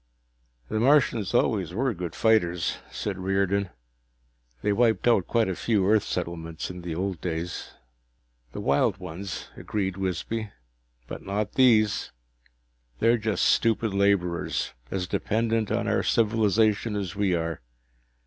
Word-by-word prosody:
"The 110 Hz, -, -1 dB
Martians 120 Hz, -6 st, +3 dB
always 95 Hz, -7 st, +1 dB
were 130 Hz, +2 st, +1 dB
good 90 Hz, -3 st, -6 dB
fighters," 90 Hz, -7 st, +2 dB
said 95 Hz, -3 st, -4 dB
Riordan. 95 Hz, +1 st, 0 dB, 0.9 s
"They 105 Hz, -, +2 dB
wiped 115 Hz, +1 st, +2 dB
out 110 Hz, -7 st, +3 dB
quite 115 Hz, -2 st, +2 dB
a 95 Hz, -, -2 dB
few 100 Hz, -3 st, +1 dB
Earth 110 Hz, 0 st, +4 dB
settlements 85 Hz, -2 st, -4 dB
in 90 Hz, 0 st, -8 dB
the 85 Hz, -2 st, -4 dB
old 95 Hz, -1 st, -3 dB
days." 85 Hz, 0 st, -4 dB, 0.8 s
"The -, -, -6 dB
wild 70 Hz, +1 st, +2 dB
ones," 90 Hz, +3 st, -7 dB
agreed 95 Hz, -3 st, -3 dB
Wisby. 95 Hz, +4 st, -3 dB, 0.6 s
"But -, -, -7 dB
not 105 Hz, +1 st, -3 dB
these. 110 Hz, -5 st, +3 dB, 0.9 s
They're 115 Hz, -, +3 dB
just 105 Hz, -3 st, 0 dB
stupid 115 Hz, -2 st, +2 dB
laborers, 100 Hz, -3 st, +1 dB, 0.2 s
as 95 Hz, -2 st, -2 dB
dependent 110 Hz, +3 st, 0 dB
on -, -, 0 dB
our -, -, +2 dB
civilization 110 Hz, -1 st, +2 dB
as 95 Hz, -3 st, -3 dB
we 100 Hz, -3 st, +1 dB
are. 80 Hz, -1 st, -3 dB
100 Hz, 130 wpm, -26 LUFS, 90-110 Hz, 0.9 s, Earth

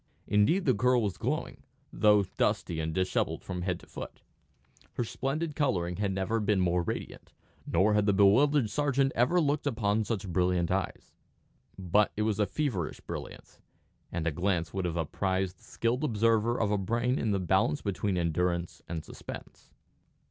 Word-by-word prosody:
Indeed 105 Hz, -, +3 dB
the 130 Hz, -, +4 dB
girl 125 Hz, +2 st, +3 dB
was 100 Hz, -3 st, -1 dB
glowing, -, -, -3 dB, 0.3 s
though 105 Hz, -1 st, +5 dB
dusty 80 Hz, -, 0 dB
and 80 Hz, 0 st, -2 dB
dishevelled 95 Hz, +2 st, -1 dB
from 90 Hz, 0 st, -4 dB
head 90 Hz, 0 st, -2 dB
to -, -, -15 dB
foot. -, -, -9 dB, 0.7 s
Her -, -, -1 dB
splendid 145 Hz, +6 st, -3 dB
colouring 90 Hz, -, 0 dB
had 100 Hz, -1 st, 0 dB
never 95 Hz, +4 st, -1 dB
been 105 Hz, -2 st, +1 dB
more 90 Hz, -1 st, +2 dB
radiant, 85 Hz, -, -6 dB, 0.3 s
nor 95 Hz, +5 st, +3 dB
had 105 Hz, 0 st, +2 dB
the -, -, +5 dB
bewildered 110 Hz, +6 st, +4 dB
sergeant 140 Hz, -2 st, +1 dB
ever 125 Hz, +10 st, +3 dB
looked 145 Hz, -2 st, 0 dB
upon 110 Hz, -4 st, +1 dB
such 105 Hz, -2 st, -3 dB
brilliant 90 Hz, 0 st, +1 dB
eyes. 95 Hz, 0 st, -3 dB, 0.6 s
But 95 Hz, +3 st, +2 dB
it 105 Hz, -, +1 dB
was 105 Hz, -1 st, 0 dB
a 105 Hz, -, +2 dB
feverish 105 Hz, -, -2 dB
brilliance, -, -, -8 dB, 0.5 s
and 80 Hz, -, -3 dB
a 80 Hz, -, +1 dB
glance 90 Hz, +1 st, -1 dB
would 95 Hz, -2 st, -2 dB
have 85 Hz, -1 st, -2 dB
apprised 95 Hz, +3 st, -1 dB
the -, -, -20 dB
skilled 120 Hz, +5 st, -1 dB
observer 115 Hz, -2 st, +2 dB
of 105 Hz, -2 st, +1 dB
a 105 Hz, -, +1 dB
brain 120 Hz, +6 st, 0 dB
in 110 Hz, -, 0 dB
the 100 Hz, -, +2 dB
balance 95 Hz, -, +1 dB
between 100 Hz, -1 st, -1 dB
endurance 85 Hz, +1 st, -1 dB
and 80 Hz, -2 st, -4 dB
suspense. -, -, -10 dB
100 Hz, 170 wpm, -29 LUFS, 90-120 Hz, 0.7 s, though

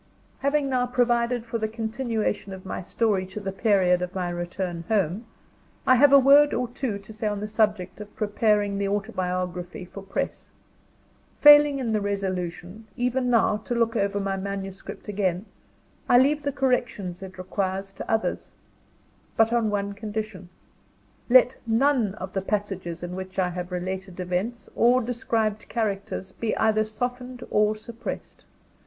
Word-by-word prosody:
Having 280 Hz, +1 st, +1 dB
now 250 Hz, -2 st, +1 dB
provided 240 Hz, -1 st, +1 dB
for 230 Hz, 0 st, -3 dB
the 220 Hz, -, 0 dB
continuation 220 Hz, -2 st, -2 dB
of 190 Hz, 0 st, -10 dB
my -, -, -4 dB
story 200 Hz, 0 st, 0 dB
to 190 Hz, +3 st, -7 dB
the 195 Hz, -1 st, -4 dB
period 190 Hz, -3 st, +3 dB
of 180 Hz, +1 st, -4 dB
my 180 Hz, -2 st, -1 dB
return 175 Hz, 0 st, -4 dB
home, 210 Hz, +1 st, 0 dB, 0.6 s
I 255 Hz, -, +6 dB
have 275 Hz, +3 st, +6 dB
a 280 Hz, -, +9 dB
word 280 Hz, +2 st, +6 dB
or 250 Hz, -, 0 dB
two 240 Hz, -4 st, -3 dB
to 200 Hz, +2 st, -12 dB
say 215 Hz, 0 st, -3 dB
on 205 Hz, -1 st, -1 dB
the 210 Hz, -, -4 dB
subject 210 Hz, -3 st, 0 dB
of 210 Hz, -, -11 dB
preparing 205 Hz, -1 st, +1 dB
the 200 Hz, -, 0 dB
autobiography 185 Hz, -3 st, -3 dB
for 200 Hz, +2 st, -10 dB
press. 195 Hz, 0 st, -4 dB, 0.9 s
Failing 295 Hz, -1 st, +8 dB
in 240 Hz, -4 st, -1 dB
the 215 Hz, -, +1 dB
resolution, 190 Hz, 0 st, -3 dB
even 250 Hz, +1 st, 0 dB
now, 225 Hz, -3 st, +3 dB
to 220 Hz, +3 st, -4 dB
look 230 Hz, 0 st, +1 dB
over 200 Hz, -1 st, 0 dB
my 195 Hz, -1 st, -1 dB
manuscript 195 Hz, 0 st, -6 dB
again, 190 Hz, -2 st, -1 dB, 0.6 s
I 245 Hz, -, +7 dB
leave 285 Hz, +4 st, +4 dB
the 285 Hz, 0 st, -1 dB
corrections 245 Hz, -9 st, -1 dB
it 190 Hz, -1 st, -9 dB
requires 195 Hz, +1 st, -3 dB
to -, -, -6 dB
others 225 Hz, 0 st, -1 dB, 0.9 s
but 225 Hz, +1 st, +4 dB
on 230 Hz, -2 st, +2 dB
one 200 Hz, -1 st, -1 dB
condition. 210 Hz, -3 st, -5 dB, 0.8 s
Let 250 Hz, +1 st, +6 dB
none 230 Hz, -3 st, +2 dB
of 185 Hz, -2 st, -7 dB
the 195 Hz, -, -1 dB
passages 195 Hz, -4 st, -3 dB
in 175 Hz, +1 st, -5 dB
which 185 Hz, 0 st, -7 dB
I 185 Hz, -2 st, +2 dB
have 180 Hz, +1 st, -5 dB
related 185 Hz, +1 st, -4 dB
events, 185 Hz, +7 st, -2 dB
or 245 Hz, +2 st, +5 dB
described 225 Hz, -3 st, -1 dB
characters, 200 Hz, -3 st, -2 dB
be 225 Hz, +2 st, -2 dB
either 215 Hz, -1 st, +3 dB
softened 245 Hz, +3 st, -4 dB
or 210 Hz, 0 st, +3 dB
suppressed. 225 Hz, +2 st, -7 dB
210 Hz, 160 wpm, -25 LUFS, 190-235 Hz, 0.9 s, a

